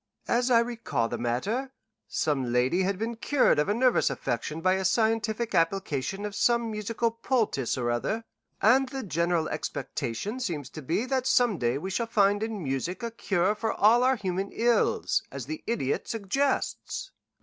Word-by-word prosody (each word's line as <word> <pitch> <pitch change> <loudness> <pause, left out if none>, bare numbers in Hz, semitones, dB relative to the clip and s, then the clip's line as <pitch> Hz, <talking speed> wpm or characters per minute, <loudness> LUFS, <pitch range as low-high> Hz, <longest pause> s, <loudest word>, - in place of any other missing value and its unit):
"As 245 +2 +2
I 240 - +6
recall 225 - -2
the - - -4
matter, 205 - -2 0.3
some 135 -5 -1
lady 125 +9 +2
had 190 +1 0
been 230 +3 -3
cured 265 - +3
of 150 - +1
a - - +3
nervous 250 -6 +3
affection 135 +3 -3
by 185 +3 +3
a 190 0 -1
scientific 220 +2 +1
application 185 +1 0
of 205 - -4
some 235 +2 +2
musical 220 +2 -1
poultice 225 - 0
or 120 -1 0
other, 215 - -1 0.4
and 255 +5 +5
the 265 0 -5
general 170 -3 0
expectation 200 - -4
seems 160 - -4
to 155 - -8
be 165 - -1
that 260 -1 -1
some 245 - +3
day 120 +2 +1
we 190 +7 -5
shall 230 +5 -1
find 205 -2 +3
in 220 -4 -3
music 145 - -3
a 235 - -2
cure 195 -3 +1
for 220 +1 -2
all 225 +4 +5
our 260 +1 +4
human 195 -2 -3
ills, 235 -1 +2
as 135 -3 -6
the 155 +3 -6
Idiot 210 - -1
suggests." 270 - -1
205 Hz, 170 wpm, -27 LUFS, 160-235 Hz, 0.4 s, I